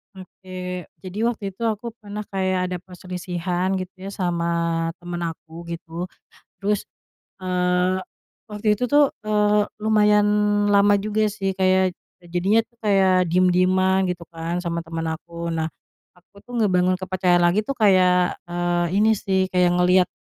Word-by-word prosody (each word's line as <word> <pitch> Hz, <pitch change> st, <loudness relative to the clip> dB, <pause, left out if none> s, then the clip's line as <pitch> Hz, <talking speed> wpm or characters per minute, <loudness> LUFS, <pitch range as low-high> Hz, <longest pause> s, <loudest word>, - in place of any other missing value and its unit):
Oke, 185 Hz, -1 st, -7 dB, 0.2 s
jadi 185 Hz, +1 st, -8 dB
waktu 215 Hz, -4 st, -1 dB
itu 195 Hz, +5 st, -5 dB
aku 225 Hz, +1 st, -2 dB
pernah 210 Hz, -1 st, -7 dB
kayak 185 Hz, -2 st, 0 dB
ada 180 Hz, -, -3 dB
perselisihan 180 Hz, 0 st, -3 dB
gitu 185 Hz, -1 st, -3 dB, 0.2 s
ya, -, -, -4 dB
sama 175 Hz, -3 st, -1 dB, 0.6 s
teman 175 Hz, 0 st, -4 dB
aku 165 Hz, +1 st, -12 dB
gitu, 170 Hz, +1 st, -6 dB, 0.5 s
terus, 205 Hz, 0 st, 0 dB, 0.6 s
eee, 180 Hz, 0 st, +1 dB, 0.5 s
waktu 210 Hz, -1 st, 0 dB
itu 250 Hz, -, 0 dB
tuh, 290 Hz, +2 st, +4 dB, 0.2 s
eee, 210 Hz, -1 st, +3 dB, 0.2 s
lumayan 210 Hz, -1 st, +4 dB, 0.4 s
lama 205 Hz, 0 st, +5 dB
juga 215 Hz, +1 st, 0 dB
sih, 195 Hz, -2 st, -2 dB
kayak 185 Hz, -1 st, +2 dB, 0.2 s
jadinya 180 Hz, +5 st, +1 dB
tuh 235 Hz, -, -36 dB
kayak 190 Hz, -3 st, +4 dB
diem-dieman, 185 Hz, +2 st, +3 dB
gitu 180 Hz, -1 st, -3 dB
kan, 170 Hz, +1 st, -4 dB
sama 170 Hz, -1 st, -3 dB
teman 165 Hz, 0 st, -3 dB
aku. 170 Hz, 0 st, -7 dB
Nah, 160 Hz, -1 st, -2 dB, 0.4 s
aku 180 Hz, +2 st, -25 dB
tuh 245 Hz, -, -12 dB
ngebangun 185 Hz, -3 st, +3 dB
kepercayaan 185 Hz, -1 st, +2 dB
lagi 175 Hz, +5 st, +2 dB
tuh 275 Hz, -, -2 dB
kayak, 185 Hz, -5 st, +3 dB
eee, 175 Hz, 0 st, 0 dB
ini 215 Hz, +2 st, +3 dB
sih, 190 Hz, -1 st, 0 dB
kayak 180 Hz, -1 st, +3 dB
ngelihat, 180 Hz, 0 st, +4 dB
185 Hz, 145 wpm, -23 LUFS, 175-205 Hz, 0.6 s, lama